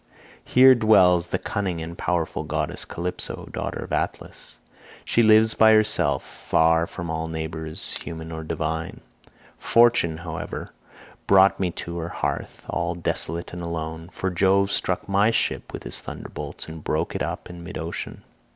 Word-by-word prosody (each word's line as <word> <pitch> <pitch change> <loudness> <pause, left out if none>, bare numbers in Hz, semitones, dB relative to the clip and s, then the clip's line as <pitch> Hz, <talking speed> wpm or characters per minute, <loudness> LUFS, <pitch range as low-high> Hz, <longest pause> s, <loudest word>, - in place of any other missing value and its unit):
Here 130 +1 +7
dwells 95 -7 +5
the - - -1
cunning 95 -5 -2
and 80 +1 -6
powerful 85 -2 -1
goddess - - -3
Calypso, 90 +2 -4
daughter - - -3
of - - -7
Atlas. - - -4 0.5
She 120 - +3
lives 110 0 +6
by 110 0 +6
herself 110 0 +2
far 80 +1 +2
from 85 -3 -6
all 80 0 -2
neighbours 80 0 -4
human 80 -1 -7
or 80 0 -5
divine. 80 +1 -3 0.6
Fortune, 115 -9 +4
however, 80 -1 -6 0.6
brought 95 0 +6
me 95 -2 +1 0.2
to 85 0 -5
her 85 0 -4
hearth - - -4
all 85 0 -1
desolate 85 0 -3
and 90 - -6
alone, 80 0 -5
for 95 - -2
Jove 95 +2 +3
struck 90 - -1
my 100 +2 +3
ship 115 - -1
with - - -7
his - - -2
thunderbolts, - - -7
and 80 -1 -9
broke - - -1
it - - -3
up - - -3
in 90 -1 -10
mid 85 - -7
ocean. 85 +1 -6
85 Hz, 155 wpm, -24 LUFS, 80-100 Hz, 0.6 s, Here